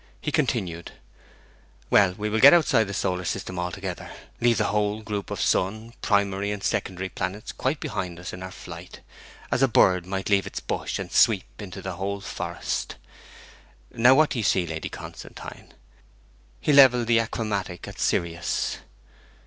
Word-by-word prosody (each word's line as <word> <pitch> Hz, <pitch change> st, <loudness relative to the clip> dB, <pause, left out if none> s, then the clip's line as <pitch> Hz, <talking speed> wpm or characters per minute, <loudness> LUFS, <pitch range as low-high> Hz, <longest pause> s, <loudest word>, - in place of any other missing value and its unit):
He 150 Hz, -, -3 dB
continued, 110 Hz, -, -1 dB, 1.0 s
'Well, 95 Hz, -3 st, +5 dB
we 105 Hz, -, -2 dB
will 110 Hz, +1 st, 0 dB
get 140 Hz, +7 st, +9 dB
outside 145 Hz, -9 st, +3 dB
the 100 Hz, -, -6 dB
solar 90 Hz, 0 st, -1 dB
system 90 Hz, 0 st, -3 dB
altogether, 90 Hz, +1 st, -4 dB, 0.3 s
leave 120 Hz, -1 st, +3 dB
the 110 Hz, -, +1 dB
whole 105 Hz, +1 st, 0 dB
group 105 Hz, -2 st, -4 dB
of -, -, -4 dB
sun, 110 Hz, +5 st, 0 dB
primary 100 Hz, -1 st, +1 dB
and 105 Hz, -2 st, -4 dB
secondary 95 Hz, 0 st, -1 dB
planets 95 Hz, +4 st, -4 dB
quite 140 Hz, +3 st, -2 dB
behind 90 Hz, -, -4 dB
us 90 Hz, -, -7 dB
in 90 Hz, -, -8 dB
our 95 Hz, -, -6 dB
flight, -, -, -10 dB, 0.5 s
as 120 Hz, +2 st, +1 dB
a 135 Hz, -, +6 dB
bird 90 Hz, -6 st, +3 dB
might 95 Hz, 0 st, -3 dB
leave 100 Hz, -1 st, +3 dB
its -, -, -5 dB
bush -, -, -3 dB
and -, -, -6 dB
sweep -, -, +4 dB, 0.2 s
into -, -, -8 dB
the -, -, -5 dB
whole 100 Hz, +1 st, -3 dB
forest. -, -, -4 dB, 1.0 s
Now 125 Hz, +3 st, +5 dB
what 155 Hz, +1 st, +4 dB
do 125 Hz, -, -1 dB
you -, -, -1 dB
see, 95 Hz, -2 st, +2 dB
Lady 80 Hz, -1 st, -5 dB
Constantine?' -, -, -10 dB, 0.9 s
He 150 Hz, -, +1 dB
levelled 130 Hz, -4 st, +7 dB
the 115 Hz, 0 st, +4 dB
achromatic 105 Hz, -5 st, -3 dB
at -, -, -10 dB
Sirius. 85 Hz, -1 st, -1 dB
100 Hz, 165 wpm, -25 LUFS, 95-115 Hz, 1.0 s, get